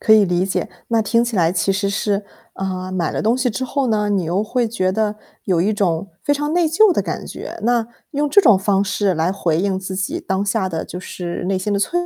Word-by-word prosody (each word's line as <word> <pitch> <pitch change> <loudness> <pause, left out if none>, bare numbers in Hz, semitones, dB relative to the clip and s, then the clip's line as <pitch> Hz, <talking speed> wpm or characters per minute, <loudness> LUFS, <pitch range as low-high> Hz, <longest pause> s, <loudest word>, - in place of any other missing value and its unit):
可 220 - +4
以 215 -2 +7
理 180 0 +1
解。 195 - -2 0.2
那 230 -1 +2
听 230 +2 +2
起 235 -3 -3
来 170 -1 +3
其 195 +1 +1
实 200 +1 0
是， 200 0 -1 0.3
呃， 185 -1 -4
买 175 -3 -1
了 - - -2
东 230 +4 +2
西 255 -1 +1
之 260 +3 -3
后 275 0 -1
呢， 210 -2 +1
你 190 -4 +1
又 180 +5 0
会 240 +2 0
觉 185 -5 0
得 215 +1 0 0.3
有 175 -3 +2
一 210 +3 +1
种 190 -2 0 0.2
非 290 - +2
常 295 +2 -2
内 345 -1 +3
疚 370 +5 +5
的 - - +1
感 - - -4
觉。 - - -7
那 235 -1 +2 0.2
用 295 0 0
这 405 - +6
种 225 - +6
方 195 0 +2
式 200 -1 0
来 160 +3 +1
回 175 -4 0
应 195 -1 0
自 190 0 -5
己 185 0 -2
当 190 +1 -1
下 200 -2 0
的， 165 -2 -3
就 180 - -7
是 180 -1 -5
内 190 +1 0
心 205 +2 -2
的 200 - +1
脆 205 - -1
200 Hz, 270 characters per minute, -20 LUFS, 185-230 Hz, 0.3 s, 以